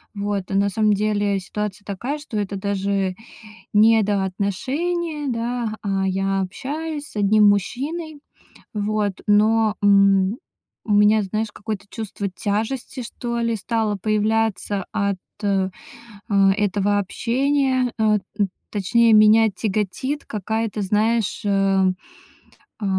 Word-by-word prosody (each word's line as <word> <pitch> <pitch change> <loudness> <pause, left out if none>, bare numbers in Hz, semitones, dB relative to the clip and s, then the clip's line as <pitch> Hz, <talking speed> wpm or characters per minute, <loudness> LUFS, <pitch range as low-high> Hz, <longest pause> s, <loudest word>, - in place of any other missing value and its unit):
Вот. 200 -1 -3
Э, 195 - -2
на 200 +1 +3
самом 210 +1 +2
деле 205 -1 0
ситуация 205 +1 -5
такая, 240 +9 -4
что 290 -7 -6
это 200 -1 -2
даже 195 -1 -1 0.6
недоотношения, 225 - +1
да, 235 -2 -2
а 195 -1 0
я 195 +1 0
общаюсь 295 +10 -4
с - - -13
одним 210 +1 +5
мужчиной, 290 - -2 0.5
вот, 210 -2 -1
но, 215 +1 +3
м, 200 0 +4 0.5
у 215 - -3
меня, 210 +1 +5
знаешь, 215 +3 -2
какое-то 205 -2 -5
чувство 210 -2 -5
тяжести, 225 +7 -3
что 235 +1 -4
ли, 230 -1 0
стало 220 0 -1
появляться 215 -1 0
от, 200 -2 0 0.3
э, 195 -2 +1 0.6
этого 200 0 +2
общения. 260 +4 0
Э, 215 -1 +3 0.2
т 205 -2 +1 0.2
точнее, 225 +3 +3
меня 215 +1 +6
тяготит 215 +8 -2
какая-то, 220 +1 -3
знаешь, 215 +2 +1
э, 195 -2 +2 0.9
а, 210 - -4
210 Hz, 115 wpm, -22 LUFS, 200-230 Hz, 0.9 s, меня